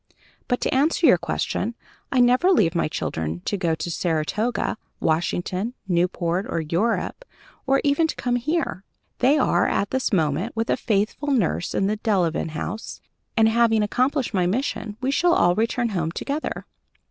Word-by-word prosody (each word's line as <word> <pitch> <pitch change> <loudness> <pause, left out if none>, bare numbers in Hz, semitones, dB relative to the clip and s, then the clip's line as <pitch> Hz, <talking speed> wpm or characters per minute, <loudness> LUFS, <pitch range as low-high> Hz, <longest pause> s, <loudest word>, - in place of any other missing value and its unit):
But, 245 - 0
to - - 0
answer 305 +6 +2
your 185 - +6
question, 225 +6 -2 0.4
I 260 - +2
never 250 +9 +4
leave 180 - +3
my 170 - +1
children 80 - -3
to - - 0
go 170 -4 0
to 160 +2 -4
Saratoga, 180 +9 -1 0.2
Washington, 180 +7 -1
Newport, 180 +2 0
or 170 - -1
Europe, 175 - -1 0.4
or 270 +1 +3
even 290 +3 +3
to - - -4
come 245 -1 0
here. 295 - -2 0.4
They 270 +5 +4
are, 270 - +2
at 200 - -1
this 260 -1 0
moment, 170 +4 0
with 225 +1 -1
a - - +3
faithful 215 +7 -1
nurse 215 - 0
at 195 - +1
the 210 +2 0
Delevan 185 -7 0
House, 210 +7 -5 0.4
and, 220 0 +5
having 225 -1 +3
accomplished 255 +4 0
my 180 -3 +2
mission, 215 -1 -2
we 265 +1 0
shall 345 +4 +3
all 175 - +4
return 230 +3 0
home 170 -6 -1
together." 285 - -4
215 Hz, 165 wpm, -23 LUFS, 175-255 Hz, 0.4 s, your